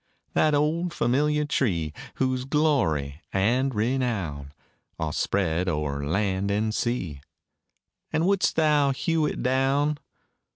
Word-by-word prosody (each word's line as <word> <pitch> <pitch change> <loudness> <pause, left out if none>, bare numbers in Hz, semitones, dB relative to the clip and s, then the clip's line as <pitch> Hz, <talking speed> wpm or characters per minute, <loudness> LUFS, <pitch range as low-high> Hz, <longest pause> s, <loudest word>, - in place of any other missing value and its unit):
That 155 -1 +3
old 165 +4 0
familiar 150 +5 +1
tree, 85 - 0 0.2
Whose 130 -1 0
glory 115 - +1
and 120 +7 +1
renown 105 - -1 0.5
Are 80 -2 -2
spread 90 -1 0
o'er 75 -3 -2
land 95 +5 0
and 105 +2 0
sea 90 - -2 0.9
And 160 +2 +1
wouldst 195 0 +2
thou 150 -3 +3
hew 160 +2 0
it - - -4
down? 135 +3 +1
125 Hz, 115 wpm, -26 LUFS, 90-150 Hz, 0.9 s, That